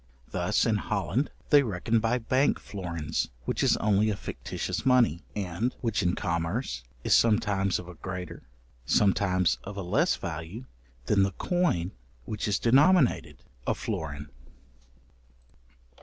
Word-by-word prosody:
Thus - - +1
in - - +2
Holland 135 +8 -1 0.2
they 145 -1 +8
reckon 110 -1 0
by 115 +2 +1
bank 130 +4 +1
florins, 85 -6 -3 0.2
which - - -1
is - - +3
only 105 0 +2
a 105 - 0
fictitious - - -4
money, 125 - +3
and 100 +5 -2
which 115 -3 0
in 90 0 +1
commerce 85 - -2 0.2
is - - +2
sometimes 105 -4 +3
of 90 - -8
a 90 - -9
greater, 90 +1 -7 0.4
sometimes 95 +2 +2
of 100 +1 -8
a 100 - -3
less 90 - +2
value 85 +9 -6 0.4
than 100 +5 +3
the 95 0 +1
coin 145 - 0 0.3
which 105 +7 -3
is 100 -2 +1
denominated 140 - +3 0.2
a - - +2
florin. 75 -1 -5
100 Hz, 135 wpm, -28 LUFS, 90-115 Hz, 0.4 s, they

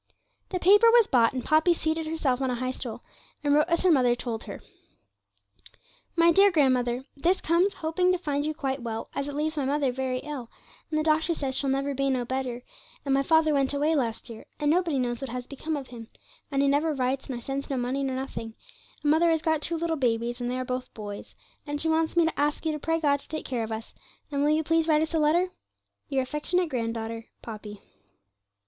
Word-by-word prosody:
The 370 - -1
paper 410 +6 +6
was 470 -1 +6
bought, 235 -7 +4
and 255 -2 -4
Poppy 315 +3 +4
seated 320 0 -1
herself 280 -5 0
on 265 - 0
a 250 - 0
high 255 +1 -2
stool, 245 -2 -7 0.4
and 290 -1 +3
wrote 300 +2 +4
as 335 +1 +1
her 370 - +5
mother 250 -5 +4
told 235 -2 -5
her: - - -7 1.6
'MY 335 0 +5
DEAR 395 +4 +6
GRANDMOTHER, 255 -6 +2
'This 350 +6 +2
comes, 345 +5 +2
hoping 345 +3 +1
to 365 - +2
find 290 -5 -2
you 310 +1 -2
quite 270 -2 -2
well, 225 -1 -5
as 280 0 -3
it 290 - -5
leaves 310 +1 -1
my 280 - 0
mother 280 -1 +1
very 260 0 -2
ill, 280 -6 -6 0.4
and 310 - 0
the - - 0
doctor 315 +2 +2
says 270 -3 -3
she'll 275 +1 0
never 275 +1 0
be 275 0 0
no 255 -2 0
better, 250 -1 -3 0.4
and 275 - +1
my 275 - +3
Father 315 +2 +3
went 275 0 +1
away 300 +3 +2
last 235 -8 -1
year, 230 -2 -10
and 295 -1 +2
nobody 340 -4 +1
knows 245 -1 -1
what 270 - -4
has 250 +1 -5
become 300 +4 -4
of 275 -2 -7
him, 230 -2 -9 0.4
and 275 -1 +1
he - - +3
never 295 +2 +2
writes 265 +1 -1
nor 250 -2 -3
sends 275 +3 -4
no 270 - -1
money 255 +3 -1
nor 265 -1 -1
nothing, 245 -4 -5 0.5
and 295 - +3
Mother 330 +2 +4
has 320 -1 +1
got 315 -2 +1
two 335 +2 -2
little 330 0 -1
babies, 240 -1 0
and 245 - -1
they 250 - -2
are 255 - -3
both 255 0 -4
boys, 205 -2 -8 0.3
and 290 0 -3
she 325 - -1
wants 320 +1 +1
me 340 - +6
to 325 - -2
ask 295 +2 0
you 320 - +2
to 300 - -4
pray 325 +3 0
God 285 -3 +2
to - - -17
take 310 - -5
care 245 -3 -2
of 225 - -5
us, 220 +1 -6 0.4
and 280 -1 0
will 295 - +3
you 310 +1 +2
please 330 +1 +2
write 310 -1 +4
us 320 - -4
a 325 - +2
letter? 335 +5 +3 0.6
'Your 270 -2 +1
affectionate 320 +6 -1
grand 230 -3 -2
daughter, 225 0 -5 0.2
'POPPY.' 210 -2 -8
280 Hz, 230 wpm, -27 LUFS, 250-320 Hz, 1.6 s, paper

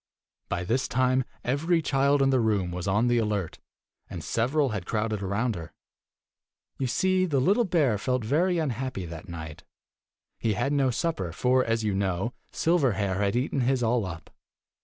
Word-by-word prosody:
By 90 0 -1
this 120 +8 0
time, 130 0 +2 0.2
every 160 +7 +1
child 140 -1 +2
in 135 - +3
the 130 - +3
room 105 -6 +1
was 90 +1 -4
on 105 +4 +2
the 120 -1 +3
alert, 105 -6 -2 0.5
and - - -6
several 135 +5 +1
had 105 -6 -4
crowded 110 -1 -1
round 100 +5 0
her. 85 -4 -6
5 - - -26 1.1
"You 135 - 0
see, 185 +8 +2
the 140 -5 +1
little 200 - +3
bear 150 - +2
felt 125 +1 -1
very 170 +9 +2
unhappy 130 - -2
that 85 +3 -9
night. 80 -3 -8 0.8
He 110 - +1
had 135 +8 0
no 135 -2 +2
supper, 125 - -2
for, 125 +8 +2
as 115 -1 0
you 105 -2 0
know, 95 +3 -1 0.2
Silverhair 120 - +1
had 100 +1 +1
eaten 130 +3 0
his 125 0 +1
all 115 0 +2
up. 85 -4 -7
120 Hz, 175 wpm, -27 LUFS, 100-135 Hz, 1.1 s, in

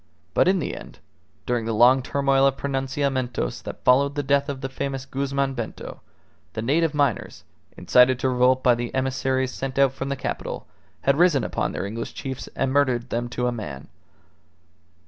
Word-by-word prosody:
But - - +3
in 190 +1 +4
the 170 - -3
end, - - -11 0.5
during 120 -2 -1
the 115 -1 -1
long 125 +4 +6
turmoil 135 0 +2
of 135 0 0
pronunciamentos 135 - -2
that - - -8
followed 140 +3 +4
the 145 - -1
death 140 +1 +2
of 135 -2 -4
the 135 - -2
famous 135 0 -4
Guzman 140 0 -1
Bento, 120 -4 -6 0.5
the 110 - -4
native 155 +5 +1
miners, 140 -6 -1 0.3
incited 125 0 +4
to 130 - 0
revolt 125 +1 +3
by 125 - +6
the 120 +1 -4
emissaries 130 0 0
sent 135 0 -5
out 140 -1 +5
from 135 0 -4
the 140 - -1
capital, 130 - -5 0.4
had 140 +2 +2
risen 170 -7 +4
upon - - -2
their - - -3
English 115 +3 -5
chiefs 130 -1 -6
and 135 0 0
murdered 130 -4 +1
them 120 +1 -2
to 125 0 -2
a 125 - +1
man. 75 - -7
130 Hz, 180 wpm, -24 LUFS, 125-140 Hz, 0.5 s, long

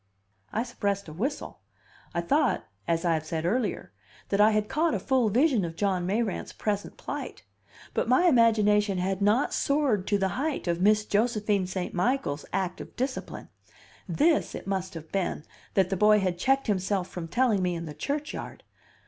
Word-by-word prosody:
I 225 - 0
suppressed 200 -5 -2
a - - -9
whistle. 255 - -4 0.5
I 170 - -1
thought 285 - +1 0.2
(as 165 +1 0
I 170 - +3
have 155 -1 -1
said 160 +1 -3
earlier) 210 - -1 0.4
that 200 +1 +2
I 210 - +7
had 215 -1 +1
caught 320 +5 +1
a - - -1
full 255 -5 +2
vision 250 - +3
of 165 -1 -4
John 185 -2 0
Mayrant's 210 0 -1
present 205 -1 -3
plight. - - -6 0.5
But - - 0
my 255 +8 +4
imagination 210 - +4
had 190 +1 -1
not 210 +7 +2
soared 275 -10 +1
to 205 - +2
the 195 -1 0
height 280 - -2
of 170 0 0
Miss 210 +2 +4
Josephine 210 -3 +1
St. 185 -1 -4
Michael's 180 - 0
act 185 -1 -2
of - - -11
discipline. 260 +1 -4 0.6
This, 305 - +2
it - - -7
must 190 -2 -3
have 160 -1 -9
been, 190 -5 -1 0.3
that 190 -1 +3
the 190 - 0
boy 210 +2 +5
had 185 -3 -1
checked 270 +6 +2
himself 190 -2 0
from 175 -3 -6
telling 235 0 +2
me 180 -1 0
in 170 0 -5
the 150 - -7
churchyard. 290 - -4
205 Hz, 180 wpm, -27 LUFS, 180-235 Hz, 0.6 s, I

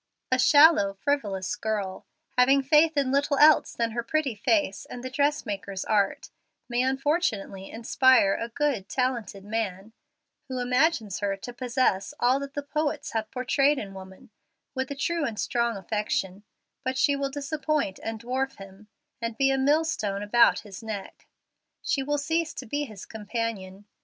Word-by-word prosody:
A 255 - +3
shallow, 290 -7 +6
frivolous 200 -7 -1
girl, 205 -4 -3 0.3
having 270 +2 +4
faith 305 +3 +4
in 275 -2 +2
little 280 +1 +1
else 305 +2 +6
than 230 -1 -1
her 235 +1 -2
pretty 275 +2 -1
face 210 - 0
and 245 - -8
the 255 - -5
dressmaker's 210 -10 -1
art, 205 -2 0 0.4
may 240 0 0
unfortunately 260 - -1
inspire 235 -2 +4
a 230 - -3
good, 260 -5 -1
talented 235 -7 -2
man, 210 -1 -3 0.5
who 260 -1 -4
imagines 250 - +1
her 200 -1 -1
to 245 +5 -8
possess 250 -2 0
all 250 +3 +3
that 280 0 -7
the 285 - -3
poets 295 0 -2
have 220 -1 -2
portrayed 275 +3 +2
in 200 -6 -6
woman, 190 0 -12 0.4
with 260 -1 -3
a 280 - -4
true 335 +3 -1
and 225 -6 -3
strong 235 -2 0
affection, 200 -1 -3 0.4
but 260 0 -2
she 280 +2 +3
will 275 0 -2
disappoint 285 - -2
and 225 0 -4
dwarf 260 +3 -2
him, 195 +1 -13 0.3
and 230 -1 -3
be 270 0 +3
a 270 - +1
millstone 265 -9 +1
about 235 +3 +4
his 205 -3 -10
neck. 215 -3 -7 0.6
She 275 - 0
will 290 +2 -1
cease 320 +3 -1
to - - -6
be 290 +6 -2
his 215 -7 -10
companion. 210 -3 -5
245 Hz, 160 wpm, -26 LUFS, 205-280 Hz, 0.6 s, shallow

